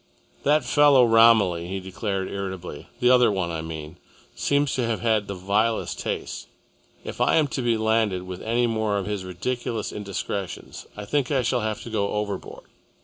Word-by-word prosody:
"That 150 -1 +2
fellow 140 -1 +6
Romilly," 115 -7 +5
he 95 +1 -3
declared 95 0 -3
irritably, 95 -5 -6
"the 125 0 +4
other 125 -3 +5
one, 95 -4 -1
I 80 -1 -3
mean, 80 0 -7 0.4
seems 145 -1 +1
to 125 - 0
have 115 -1 -2
had 110 -3 +1
the 100 - -4
vilest 105 +5 0
tastes. - - -4 0.6
If - - -6
I - - +4
am 155 -2 +3
to 130 - -3
be 120 -2 +1
landed 110 -4 +1
with 90 0 -7
any 120 +2 +1
more 110 -3 0
of 100 - -2
his 105 -1 -3
ridiculous 110 +5 -3
indiscretions, 100 -1 -5
I 105 - -6
think 140 +4 0
I 135 -3 +1
shall 120 +1 +1
have 110 -1 -3
to 115 - -8
go 100 -2 -1
overboard. 105 -2 -4
105 Hz, 180 wpm, -24 LUFS, 95-120 Hz, 0.6 s, fellow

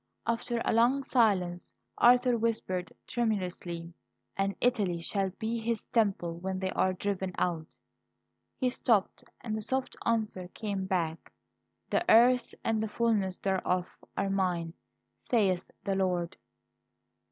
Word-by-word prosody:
After 230 +1 -1
a - - +2
long 245 +5 +4
silence, 190 -9 +1 0.3
Arthur 245 0 +6
whispered 220 -6 -1
tremulously: 180 -7 -2 0.4
"And 195 0 0
Italy 205 -9 +1
shall 195 +3 -1
be 230 +1 -2
His 225 -1 -2
Temple 190 -7 +1
when 190 +1 -3
they 185 0 -2
are 185 - +2
driven 190 0 -2
out 165 -3 -1 0.5
" - - -52
He 255 -2 +2
stopped; 230 -2 +1 0.2
and 220 -2 -3
the 220 - -3
soft 260 +4 -2
answer 215 -5 0
came 200 -3 -3
back: 165 -4 -2 0.6
"'The - - +2
earth 245 +2 +5
and 225 -1 +1
the 220 - -2
fulness 210 -5 +1
thereof 185 -2 0 0.3
are 195 0 0
mine, 175 -4 0 0.6
saith 195 -6 +2
the 200 - 0
Lord.'" 180 -3 0
200 Hz, 130 wpm, -30 LUFS, 180-230 Hz, 0.6 s, Arthur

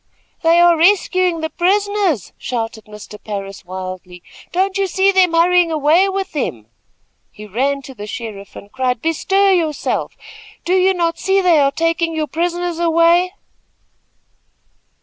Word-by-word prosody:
"They 330 +1 +4
are 345 0 +5
rescuing 365 -1 +2
the 320 - -3
prisoners," 395 - 0
shouted 225 -2 -4
Mr. 210 0 -12
Parris, 200 -2 -6
wildly. 185 -1 -8 0.3
"Don't 380 +2 0
you 390 - +1
see 385 +2 +2
them 370 -3 +3
hurrying 345 0 +3
away 315 +5 +3
with 390 0 -3
them." 125 - -4 0.7
He 210 - -11
ran 270 +7 -1
to 265 - -10
the 210 -3 -9
sheriff 210 -3 -8
and 200 - -12
cried: 255 -2 -1
"Bestir 385 +5 +2
yourself! 320 -5 -2 0.5
Do 355 - 0
you 375 0 +3
not 335 -1 -1
see 390 0 +1
they 355 -5 +4
are 275 -1 +3
taking 330 +2 -1
your 310 -1 -1
prisoners 345 +3 -3
away?" 340 +2 +3
330 Hz, 145 wpm, -17 LUFS, 250-365 Hz, 0.7 s, are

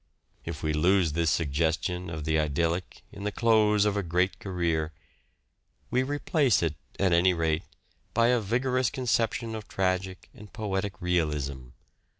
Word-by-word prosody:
If - - -6
we 75 0 0
lose 85 +2 +3
this 85 +1 +1
suggestion 80 +3 0
of 80 -2 -5
the 80 +1 +1
idyllic 80 +4 -1
in 100 - -9
the 105 - -1
close 105 -2 +3
of 105 -1 +1
a 100 - +1
great 90 +2 0
career, 85 -4 -1 1.0
we 125 - +3
replace 140 - +1
it, 80 -3 0 0.3
at 95 -3 +3
any 90 +2 +4
rate, 80 -1 0 0.5
by 115 0 +4
a 125 -1 +3
vigorous 125 +4 +1
conception 115 -2 -1
of 110 -1 -6
tragic 95 0 -2
and 105 -1 -13
poetic 100 -4 -3
realism. 75 -7 -1
90 Hz, 150 wpm, -28 LUFS, 80-105 Hz, 1.0 s, any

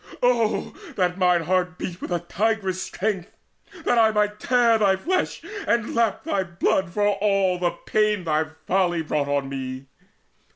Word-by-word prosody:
Oh 230 -5 +1 0.2
that 180 0 0
mine 180 -2 +3
heart 180 +1 0
beat 180 0 -6
with - - -5
a 175 -2 0
tigress' 195 0 -1
strength, 195 -2 -3 0.5
That 240 - +3
I 220 -1 +6
might 210 -1 0
tear 240 -3 +3
thy 195 -2 +4
flesh 365 - -2 0.2
and 235 -2 +1
lap 230 -3 +1
thy 195 - 0
blood 185 +1 0
For 205 +2 +1
all 195 -2 +1
the 175 -1 +2 0.2
pain 210 -3 +1
thy 155 -1 +1 0.2
folly 175 -3 +1
brought 150 -2 -1
on 140 -1 0
me! 130 0 -6
190 Hz, 160 wpm, -24 LUFS, 175-215 Hz, 0.5 s, I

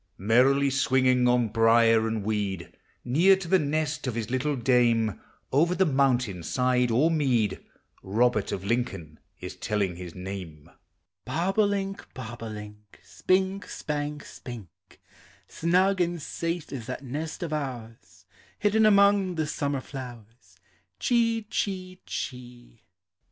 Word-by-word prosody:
Merrily 130 +7 +3
swinging 130 -1 +3
on 120 -2 +2
brier 115 0 +4
and 110 -2 -2
weed, 100 -4 -3 0.3
Near 170 +10 +5
to 190 -2 -7
the 190 +2 +4
nest 150 -1 -1
of 125 - -2
his 115 -1 -4
little 140 +3 0
dame, 120 -4 +2 0.3
Over 165 +6 +3
the 190 - +3
mountain 125 - +1
side 125 +5 +1
or 135 +9 +3
mead, 125 -10 +1 0.4
Robert 110 +1 +1
of 95 - -4
Lincoln 100 -9 -2 0.2
is - - -7
telling 100 -5 -2
his 90 -2 -8
name: 90 -5 -8 0.5
Bob 170 - -1
o' 215 - +6
link, 195 -1 -3
bob 120 -2 -8
o' 115 - -5
link, 105 -1 -10
Spink, 190 +1 0
spank, 150 -1 -4
spink; 110 - -11 0.5
Snug 185 +3 +2
and 175 0 0
safe 165 +2 -4
is 125 -4 -6
that 130 +2 -5
nest 150 +6 -5
of 160 -2 -4
ours, 115 -10 -6 0.3
Hidden 215 +1 +3
among 200 -2 +4
the 160 -1 0
summer 140 -2 -2
flowers. 120 -4 -11 0.4
Chee, 230 -2 +1
chee, 185 -3 -4
chee. 120 -3 -7
130 Hz, 135 wpm, -27 LUFS, 115-165 Hz, 0.5 s, o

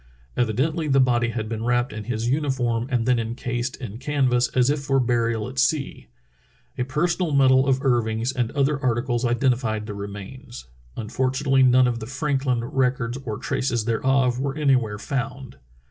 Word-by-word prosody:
Evidently 140 +8 0
the 135 -1 +3
body 120 -2 +2
had 110 -2 -3
been 110 0 -4
wrapped 120 +1 0
in 105 -1 -6
his 115 -1 -2
uniform 125 -4 0
and 120 -4 0
then 125 -1 +3
encased 120 +2 -3
in 115 -3 -8
canvas 130 -3 +1
as 130 +1 +4
if 150 - -1
for 135 -1 +1
burial 115 -3 0
at 130 0 -5
sea. 140 +1 0 0.7
A 125 - -1
personal 165 +5 0
medal 130 -1 +4
of 135 +1 +1
Irving's 115 -1 +1
and 120 -3 -1
other 140 0 +1
articles 120 -1 0
identified 120 -3 0
the 105 - -6
remains. 105 - -8 0.3
Unfortunately 130 +4 0
none 130 0 +5
of 120 -1 -1
the 110 - -7
Franklin 135 -2 -1
records 125 0 -1
or 110 -3 -3
traces 120 -4 -1
thereof 125 +2 +1
were 135 +1 -2
anywhere 130 -8 +1
found. 135 +2 -4
125 Hz, 160 wpm, -23 LUFS, 115-135 Hz, 0.7 s, none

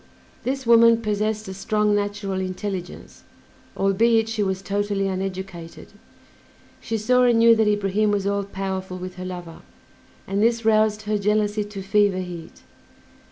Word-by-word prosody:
This 265 +1 -3
woman 230 0 +6
possessed 215 0 -1
a 190 - -5
strong 210 +2 0
natural 205 -2 -2
intelligence, 185 -1 -6 0.6
albeit 225 +3 +3
she 225 -1 -2
was 190 -1 -1
totally 200 0 -1
uneducated; 190 -3 -6 0.9
she 225 - -3
saw 250 +4 +2
and 240 -2 +4
knew 230 0 +6
that 220 -1 +2
Ibrahim 205 0 +1
was 205 -1 0
all 200 0 0
powerful 190 -1 -4
with 185 0 -8
her 185 - -6
lover, 175 -3 -8 0.6
and 195 +1 -1
this 230 0 +2
roused 215 -1 +3
her 210 0 -1
jealousy 210 +1 +1
to 205 -2 -8
fever 200 0 +2
heat. 175 -3 -8
205 Hz, 145 wpm, -23 LUFS, 190-215 Hz, 0.9 s, woman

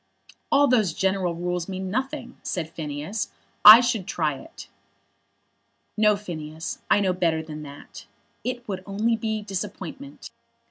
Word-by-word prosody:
"All 285 0 +5
those 225 -8 +2
general 190 -3 0
rules 175 +1 -3
mean 190 0 -4
nothing," 260 +1 -3
said 170 -5 -3
Phineas. 155 +6 -4 0.3
"I 215 +3 +12
should 240 -6 -1
try 155 -3 0
it." 135 - -11 1.3
"No, 210 -1 +4
Phineas. 160 -5 -6
I - - +5
know 190 -2 +2
better 165 -3 0
than 155 -1 -8
that. 145 -1 -11 0.4
It 250 -1 -4
would 190 -3 -4
only 215 +4 +1
be 220 -1 -3
disappointment. 210 +8 -7
195 Hz, 135 wpm, -25 LUFS, 165-220 Hz, 1.3 s, I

